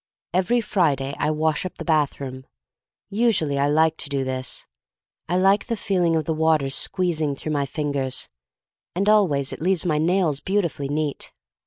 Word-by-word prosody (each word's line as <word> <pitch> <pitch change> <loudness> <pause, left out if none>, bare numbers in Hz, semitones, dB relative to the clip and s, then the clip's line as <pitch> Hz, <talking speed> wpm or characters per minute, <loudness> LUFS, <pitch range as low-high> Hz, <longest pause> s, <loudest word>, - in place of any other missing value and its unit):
Every 190 +7 +2
Friday 145 - +1
I - - +1
wash 155 0 +1
up 185 - -5
the - - -6
bath 155 -4 +1
room. 130 -1 -7 0.6
Usually 200 -10 +2
I 140 - +3
like 160 +2 +3
to - - -2
do 140 -2 0
this. 130 -1 -4 0.6
I 180 - +2
like 195 +2 +3
the 230 -2 -1
feeling 180 -5 +1
of 160 -2 0
the 160 - 0
water 155 -3 +2
squeezing 155 -2 0
through 155 - -5
my 140 -2 0
fingers, 140 -2 -2 0.7
and 195 +3 0
always 170 -11 +3
it - - -8
leaves 180 0 +1
my 155 -3 +1
nails 165 -3 +2
beautifully 170 -7 -1
neat. 150 -1 -2
155 Hz, 170 wpm, -23 LUFS, 140-185 Hz, 0.7 s, I